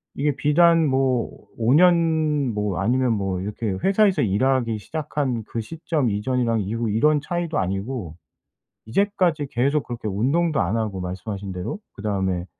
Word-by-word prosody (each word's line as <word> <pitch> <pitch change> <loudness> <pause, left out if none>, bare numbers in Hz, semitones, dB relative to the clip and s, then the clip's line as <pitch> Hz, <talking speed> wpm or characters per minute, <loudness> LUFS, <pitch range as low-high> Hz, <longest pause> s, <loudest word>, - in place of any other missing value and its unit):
이게 145 0 0
비단 165 +3 +4
뭐 130 -3 0
5 115 +2 +2
년 160 -5 +3
뭐 105 -4 -2
아니면 120 +4 +2
뭐 95 -3 -2
이렇게 105 +2 -3
회사에서 200 0 +3
일하기 115 +2 +1
시작한 140 -1 -3
그 115 - -5
시점 155 +1 -2
이전이랑 115 +2 0
이후 115 +3 -2
이런 150 +8 +3
차이도 170 0 -3
아니고 95 - -3 0.7
이제까지 170 - +1
계속 140 +4 +1
그렇게 120 -2 -6
운동도 140 - +1
안 100 +4 0
하고 105 -4 -2
말씀하신 95 +2 -5
대로 90 - -4 0.2
그다음에 95 -4 -2
120 Hz, 315 characters per minute, -23 LUFS, 105-150 Hz, 0.7 s, 비단